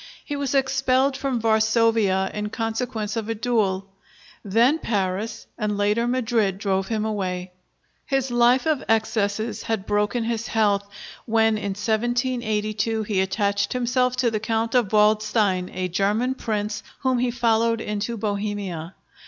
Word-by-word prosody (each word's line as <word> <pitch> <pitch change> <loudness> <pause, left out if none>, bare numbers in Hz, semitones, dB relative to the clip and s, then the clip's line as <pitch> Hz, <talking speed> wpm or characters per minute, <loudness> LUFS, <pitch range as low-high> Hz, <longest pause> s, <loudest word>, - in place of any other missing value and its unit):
He 290 - -4
was 280 -1 -2
expelled 265 0 +2
from 270 -2 -1
Varsovia 220 -3 +2
in 210 0 -3
consequence 225 -1 -3
of 225 -1 -3
a 225 - -1
duel. 210 -5 0 0.6
Then 235 +10 +3
Paris, 200 -1 -2
and 210 -2 -1
later 210 +3 +1
Madrid, 225 -6 +1
drove 195 -1 -1
him 220 -1 -1
away. 185 -4 -3 0.6
His 270 -2 0
life 240 +3 +4
of 310 -4 +1
excesses 220 0 0
had 220 -4 -2
broken 210 +3 0
his 230 -1 -2
health, 205 -2 +1 0.4
when 225 -1 +3
in 200 -2 -3
1782 220 -1 0
he 205 -3 0
attached 200 +1 0
himself 250 0 +1
to 250 -2 +1
the 215 - -1
Count 225 +1 -1
of 240 -6 +2
Waldstein, 210 -3 +2
a 185 0 -2
German 205 +8 +1
prince 210 -4 -3 0.2
whom 260 -2 +1
he 250 0 +1
followed 230 -1 +2
into 210 +2 -3
Bohemia. 200 -5 -3
220 Hz, 140 wpm, -23 LUFS, 205-240 Hz, 0.6 s, life